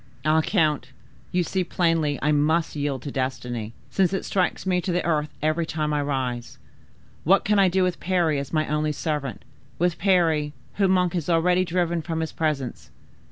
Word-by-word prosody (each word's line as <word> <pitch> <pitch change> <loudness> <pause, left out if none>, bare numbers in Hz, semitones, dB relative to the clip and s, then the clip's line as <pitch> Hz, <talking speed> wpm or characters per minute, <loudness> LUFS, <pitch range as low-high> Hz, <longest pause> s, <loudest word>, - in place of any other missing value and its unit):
Ah! 155 +1 +4
count, 155 -4 +1 0.4
you 180 0 +2
see 185 +2 -1
plainly 165 -4 +1
I 150 - +3
must 155 +3 +2
yield 145 -3 -2
to 140 - -5
destiny, 125 -4 -3 0.2
since 190 -1 +2
it 195 - -2
strikes 185 -1 0
me 180 -1 +1
to 180 - -2
the 175 +1 0
earth 150 -3 +1
every 155 +2 +1
time 155 -2 -1
I 145 - +1
rise. 130 -4 -3 0.7
What 190 +5 +4
can 210 0 +3
I 195 - +6
do 185 +1 +2
with 180 -2 -1
Parry 170 -5 +1
as 140 -1 -6
my 155 -1 +1
only 150 0 0
servant, 150 -5 -3 0.3
with 175 0 0
Parry, 165 -6 +2 0.2
whom 195 -2 +3
Monk 180 -2 +2
has 175 -2 -2
already 180 +2 +3
driven 175 -1 0
from 160 0 -3
his 160 - -3
presence? 145 - -2
160 Hz, 185 wpm, -24 LUFS, 150-180 Hz, 0.7 s, I